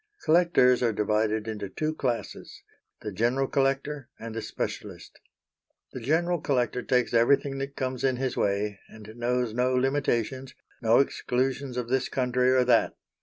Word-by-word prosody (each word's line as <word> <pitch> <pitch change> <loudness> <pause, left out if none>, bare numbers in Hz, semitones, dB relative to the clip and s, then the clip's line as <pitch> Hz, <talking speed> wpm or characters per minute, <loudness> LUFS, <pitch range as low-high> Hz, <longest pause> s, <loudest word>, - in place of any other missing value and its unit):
Collectors 155 -7 +4
are 120 -2 +2
divided 105 +1 0
into 105 -3 -5
two 155 +9 -2
classes 125 -6 -4 0.4
the 105 - -5
general 120 +7 +1
collector 135 0 -1
and 115 0 -7
the 115 - -4
specialist. - - -6 0.7
The - - -5
general 165 +7 0
collector 125 -3 0
takes 125 -2 +1
everything 135 +4 +3
that 135 0 -5
comes 130 -2 -3
in 130 -1 +2
his 130 0 -2
way, 100 0 -1
and 110 0 -12
knows 120 -1 -1
no 125 +2 +1
limitations, 130 -1 -1 0.3
no 115 0 +4
exclusions 130 -1 0
of 120 -2 -2
this 130 0 0
country 125 -1 +1
or 130 0 +4
that. 120 -2 +3
125 Hz, 150 wpm, -27 LUFS, 115-135 Hz, 0.7 s, Collectors